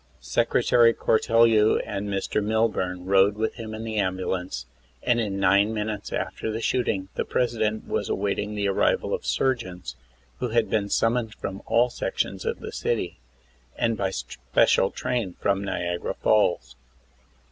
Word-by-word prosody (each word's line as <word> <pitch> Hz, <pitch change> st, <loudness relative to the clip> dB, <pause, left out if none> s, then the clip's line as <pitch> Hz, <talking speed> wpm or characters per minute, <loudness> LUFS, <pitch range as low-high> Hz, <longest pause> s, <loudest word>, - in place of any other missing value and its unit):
Secretary 115 Hz, -, +3 dB
Cortel 115 Hz, +1 st, +3 dB
you 110 Hz, -1 st, +4 dB
and 100 Hz, +1 st, -4 dB
Mr. 100 Hz, +1 st, -1 dB
Milburn 100 Hz, -5 st, 0 dB
rode 100 Hz, +1 st, +4 dB
with 110 Hz, +1 st, -1 dB
him 110 Hz, -1 st, -7 dB
in 110 Hz, -, -6 dB
the 110 Hz, -1 st, -4 dB
ambulance, 95 Hz, -3 st, -2 dB, 0.4 s
and 120 Hz, -1 st, +2 dB
in 100 Hz, -4 st, -2 dB
nine 100 Hz, +3 st, +3 dB
minutes 105 Hz, -1 st, -3 dB
after 110 Hz, -, -3 dB
the 110 Hz, -, -3 dB
shooting 110 Hz, -6 st, -1 dB
the -, -, -1 dB
President 110 Hz, -3 st, -1 dB
was -, -, -2 dB
awaiting 105 Hz, +1 st, -1 dB
the 100 Hz, -1 st, 0 dB
arrival 100 Hz, -, +1 dB
of -, -, -3 dB
surgeons, 95 Hz, -, -1 dB, 0.4 s
who 125 Hz, -, -1 dB
had 115 Hz, 0 st, +1 dB
been 100 Hz, -2 st, 0 dB
summoned 115 Hz, 0 st, +1 dB
from 95 Hz, 0 st, -6 dB
all 120 Hz, +1 st, +3 dB
sections -, -, -3 dB
of -, -, -2 dB
the -, -, -6 dB
city, -, -, -2 dB, 0.6 s
and 115 Hz, -1 st, +1 dB
by 100 Hz, -2 st, -1 dB
special 65 Hz, -8 st, +1 dB
train 115 Hz, -8 st, -3 dB
from 100 Hz, 0 st, +1 dB
Niagara 85 Hz, -3 st, -3 dB
Falls. 85 Hz, -, +1 dB
105 Hz, 150 wpm, -25 LUFS, 95-115 Hz, 0.6 s, you